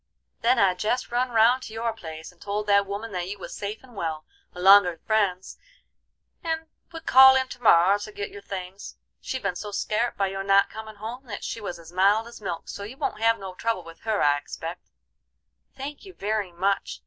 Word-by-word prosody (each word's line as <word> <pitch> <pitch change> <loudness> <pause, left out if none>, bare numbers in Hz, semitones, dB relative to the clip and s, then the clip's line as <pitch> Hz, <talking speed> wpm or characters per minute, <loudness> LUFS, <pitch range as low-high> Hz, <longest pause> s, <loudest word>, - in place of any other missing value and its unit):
Then 245 +2 +3
I 190 -2 +4
jest 215 +8 -2
run 250 +1 +1
round 235 +2 +4
to 220 - -9
your 230 0 -2
place 160 -6 -9
and 180 - -28
told 205 +1 -3
that 200 -1 +3
woman 205 +3 -5
that 180 -2 -3
you 205 - -5
was - - -8
safe 210 +3 -5
and 250 -3 -16
well, 160 -4 -3 0.3
along'r 180 -1 +6
friends, 200 -4 0 0.8
and 325 -1 -2 0.3
would 325 -1 -9
call 265 +1 +9
in 260 0 +2
to 250 - -9
morrer 195 -2 +5
to 215 +1 -7
get 205 -1 -5
your 200 - -10
things. 195 0 -7 0.2
She'd 260 -3 -5
ben 195 -3 -1
so 210 +4 -6
scart 215 +3 -1
by 195 - +2
your 195 0 -4
not 195 0 +4
comin' 220 0 -8
home 230 +6 -7
that 210 -4 -7
she 225 - -4
was 190 -4 -5
as 165 0 -13
mild 200 +5 +3
as 235 - -12
milk, 170 -4 -5
so - - -7
you 215 +6 -8
won't 215 - -3
have 230 0 +4
no 190 -1 -7
trouble 225 -1 -2
with 165 0 -13
her, 220 -2 0
I 145 0 +4
expect." - - -8 0.9
"Thank 280 +2 -7
you 380 -2 -12
very 205 -2 -2
much! 195 +3 -1
205 Hz, 210 wpm, -25 LUFS, 190-230 Hz, 0.9 s, call